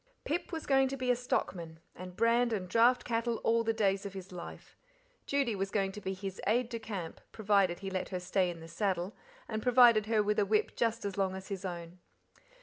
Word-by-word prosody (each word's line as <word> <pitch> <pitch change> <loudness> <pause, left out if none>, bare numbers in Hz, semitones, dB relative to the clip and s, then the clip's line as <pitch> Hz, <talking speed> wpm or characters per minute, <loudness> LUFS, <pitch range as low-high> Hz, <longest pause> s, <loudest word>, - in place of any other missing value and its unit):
Pip 340 +5 -2
was 325 -2 -4
going 270 -1 +4
to 275 +1 -4
be 255 -1 +1
a - - +3
stockman, 170 -9 -3 0.2
and 180 0 -9
brand 235 +2 +3
and 190 -4 -2
draft 235 +6 +4
cattle 230 0 0
all 230 0 +3
the 225 - +1
days 200 -3 +1
of 200 -1 -6
his 190 -1 -8
life. 180 -1 -9 0.5
Judy 275 -6 +1
was 195 0 -2
going 195 -1 0
to 210 - -9
be 190 -1 -3
his 190 0 -6
"aide 235 +3 +2
de 230 -2 -4
camp", 195 -7 -6
provided 200 -4 +2
he 195 -1 -4
let 185 -1 -3
her 185 - -3
stay 180 +1 +1
in 170 -1 -7
the 165 - -9
saddle, 185 +2 -2 0.3
and 220 - -3
provided 240 -3 +6
her 220 -2 +3
with 210 +1 +1
a - - +4
whip 215 +1 +1
just 230 -1 0
as 200 -1 -3
long 190 -1 +1
as 190 +1 -8
his 195 -2 -4
own. 175 -1 -6
205 Hz, 225 wpm, -32 LUFS, 185-230 Hz, 0.5 s, provided